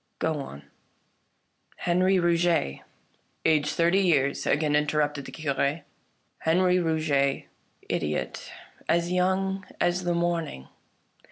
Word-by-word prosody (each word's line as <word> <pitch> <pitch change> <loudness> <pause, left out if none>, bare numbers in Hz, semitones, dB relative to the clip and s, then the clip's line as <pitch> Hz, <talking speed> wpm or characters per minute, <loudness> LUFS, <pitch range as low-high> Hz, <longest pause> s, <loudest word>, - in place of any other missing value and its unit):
Go 160 -2 -1
on." 75 - -8 0.6
" - - -39
Henri 185 +2 +3
Rouget 170 - +1 0.2
" - - -40
" - - -44
Aged 155 -2 +3
thirty 170 +3 +3
years," 145 -8 +2
again 150 -1 +2
interrupted 150 -1 0
the - - -8
Cure. 145 0 -1 0.3
" - - -45
Henri 180 +3 +3
Rouget, 155 -5 +1 0.4
idiot; 75 0 -3 0.4
as 170 +1 +2
young 190 +1 0 0.2
as 175 +1 +1
the 175 -1 0
morning. 170 - -2
165 Hz, 120 wpm, -26 LUFS, 145-175 Hz, 0.6 s, Henri